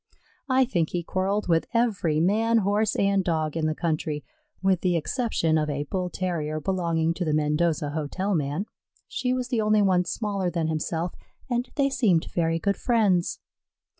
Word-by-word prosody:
I 260 0 +4
think 170 -10 0
he 175 -1 -2
quarrelled 195 +4 -1
with 165 -2 +2
every 200 -10 +2
man, 220 +7 +3
Horse, 205 +1 +1
and 200 -1 +2
Dog 160 -3 -1
in 160 -1 0
the 155 - -1
country, 155 -3 -2 0.4
with 190 -2 +2
the 180 -2 +1
exception 165 - 0
of 150 0 -1
a 145 0 -2
Bull 180 +4 -3
terrier 160 -5 -2
belonging 165 -1 0
to 180 - -3
the 155 -3 +1
Mendoza 150 0 +1
hotel 160 +7 -2
man. 150 +3 -1 0.4
She 250 - -2
was 255 -1 -1
the 235 -3 +1
only 215 -1 +3
one 180 -2 +3
smaller 200 -3 -2
than 165 -2 -1
himself, 160 +2 -2 0.4
and 245 +1 0
they 275 -1 +2
seemed 195 -11 +2
very 165 -1 +1
good 200 +4 0
friends. 205 -8 +1
180 Hz, 170 wpm, -26 LUFS, 160-205 Hz, 0.4 s, I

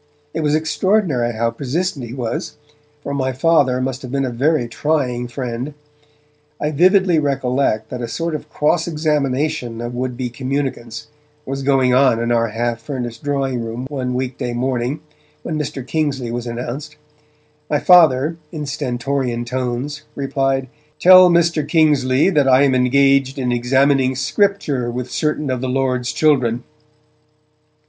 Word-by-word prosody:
It - - -3
was 150 -1 +1
extraordinary 160 - +1
how 115 +1 0
persistent 140 +2 -3
he - - -10
was, 120 -4 -4 0.5
for 140 - -4
my 130 -2 -1
Father 135 -2 +2
must 130 0 -3
have 130 - -8
been 135 0 0
a 125 - -3
very 130 +1 +1
trying 125 -2 -1
friend. 125 +3 -5 0.8
I 150 - -1
vividly 180 +2 +4
recollect 130 -5 0
that 125 - -5
a 120 - -3
sort 165 +8 -3
of 150 0 -6
cross 155 +3 +1
examination 150 -5 -1
of 120 +1 -5
would 125 0 -3
be 125 -2 -3
communicants 130 -3 -4 0.4
was 135 +1 -4
going 135 -2 +2
on 130 -3 +4
in 115 +1 -1
our 115 -1 +2
half 115 +1 -2
furnished 120 0 -5
drawing 135 -3 -1
room 115 +3 -5
one 125 -3 -3
weekday 125 -1 -3
morning, 125 +3 -2 0.4
when 155 -2 -3
Mr. 135 -3 -4
Kingsley 135 -5 -2
was 120 0 -4
announced; 125 +6 -5 0.7
my 150 - +2
Father, 160 -2 +5
in 150 -3 -5
stentorian 125 -3 -2
tones, 130 +4 -3
replied: 135 -1 -1 0.3
'Tell 185 0 +8
Mr. 170 -2 +3
Kingsley 150 -1 +3
that 145 -5 +2
I 130 +1 +5
am 135 -2 +3
engaged 135 +1 +3
in 125 -2 -1
examining 130 +2 +2
Scripture 145 - 0
with 125 +1 -5
certain 150 -2 -1
of 125 -1 -2
the 130 - -2
Lord's 125 -2 0
children.' 130 -6 +2
135 Hz, 150 wpm, -19 LUFS, 125-150 Hz, 0.8 s, Tell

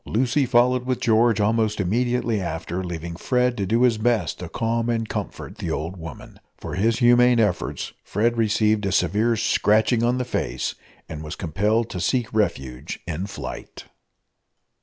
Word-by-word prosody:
Lucy 130 +4 +1
followed 125 +1 +3
with 130 0 -1
George 115 -1 +3
almost 110 0 +1
immediately 115 +2 0
after, 85 +1 -4
leaving 85 -1 -5
Fred 125 +6 +1
to 100 -2 -1
do 115 +4 +2
his 120 -3 +3
best 110 -6 0
to 90 - -6
calm 115 +2 -1
and 115 -1 -1
comfort - - -6
the - - -3
old 85 +4 -3
woman. 80 -6 -10 0.2
For - - -7
his 110 +5 +1
humane 120 0 +5
efforts 105 -6 -1
Fred 115 +4 0
received 110 -2 +2
a - - -1
severe 105 +6 +2
scratching 110 +1 +2
on 120 +1 +2
the 125 - -2
face, - - -2 0.3
and 75 -1 -7
was 75 +2 -6
compelled 105 +7 0
to 90 - -4
seek 120 +5 0
refuge 70 - -2
in 90 +3 -4
flight. 100 - -8
110 Hz, 160 wpm, -23 LUFS, 90-120 Hz, 0.3 s, humane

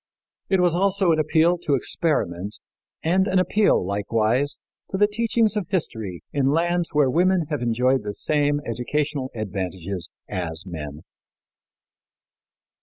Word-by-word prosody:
It 190 - +3
was 175 -2 +3
also 190 0 +2
an 160 - +2
appeal 165 +3 +3
to 155 -5 +1
experiment 105 - -1 0.5
and 185 +4 +2
an 190 - +1
appeal, 185 - +3
likewise, 110 +7 0 0.3
to 190 - -2
the 205 - +5
teachings 220 0 +1
of 205 -5 -2
history 110 - -3
in 140 -2 +1
lands 170 +3 +1
where 150 -3 +3
women 180 +5 +2
have 150 - -1
enjoyed 125 +2 +2
the 105 -1 -5
same 145 -1 +1
educational 135 +3 -2
advantages 95 -3 -4 0.2
as 85 -4 -3
men. 75 -3 -7
145 Hz, 130 wpm, -23 LUFS, -, 0.5 s, the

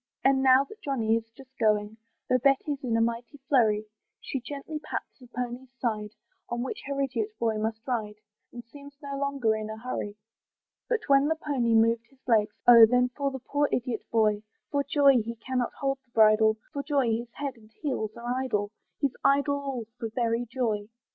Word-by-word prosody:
And 270 0 +4
now 260 0 +6
that 430 +10 -14
Johnny 230 - +1
is 225 0 -3
just 265 +2 -17
going, 210 0 +2 0.3
Though 255 - +3
Betty's 275 +2 +1
in 235 -3 +1
a - - +2
mighty 235 +4 -2
flurry, 215 -6 +3 0.3
She 270 - -4
gently 290 +4 -6
pats - - -6
the 250 - -14
pony's 250 +1 -5
side, 215 -4 -2 0.4
On 240 0 -2
which 260 - -5
her 280 0 -3
idiot 245 -6 -1
boy 225 -2 0
must 220 +1 -3
ride, 220 -4 -2 0.4
And 240 -1 -9
seems 280 +3 -13
no 280 0 -4
longer 275 -5 0
in 215 0 -4
a 220 - -6
hurry. 220 -3 -5 0.7
But 470 -2 +1
when 275 +1 +5
the 320 - +1
pony 260 -7 0
moved 230 +1 +3
his 270 -1 -29
legs, 215 -3 +3
Oh! 230 -2 +10
then 250 +2 +3
for 280 +2 -2
the 265 - -5
poor 285 +3 0
idiot 245 -2 -1
boy! 215 -2 +2 0.3
For 285 -1 +1
joy 280 -3 +4
he 230 +2 -5
cannot 250 +1 -2
hold 275 -1 0
the 255 - -40
bridle, 220 -1 +5 0.2
For 280 - -2
joy 280 -5 +1
his 230 +1 -2
head 280 -2 -4
and 215 -2 -19
heels 220 -7 -2
are 240 +2 -2
idle, 210 -5 -1 0.3
He's 280 -3 0
idle 285 +1 +3
all 270 -5 -4
for 225 -2 -3
very 230 +1 -1
joy. 220 -4 -2
245 Hz, 195 wpm, -28 LUFS, 225-275 Hz, 0.7 s, Oh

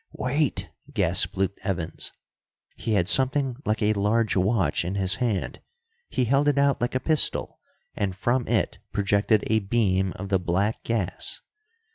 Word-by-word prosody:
"Wait!" 140 +2 -1 0.2
gasped 95 +3 +1
Luke 95 0 +1
Evans. 85 -4 -3 0.6
He 110 - -2
had 95 -4 +2
something 130 +1 +3
like 110 +1 0
a 105 +1 +3
large 110 +2 +1
watch 95 0 +1
in 90 +3 -3
his 95 -1 +1
hand. 115 -7 -2 0.5
He 125 - 0
held 140 +4 +2
it 145 -1 +2
out 140 -2 +2
like 120 +1 -1
a - - +2
pistol, 155 +1 +2 0.4
and 95 -3 -2
from 120 +5 0
it - - 0
projected 100 +1 +2
a 110 0 +2
beam 95 -3 +1
of 95 +1 -7
the 95 -1 +2
black 95 +5 -1
gas. 105 -5 -1
105 Hz, 155 wpm, -25 LUFS, 95-125 Hz, 0.6 s, something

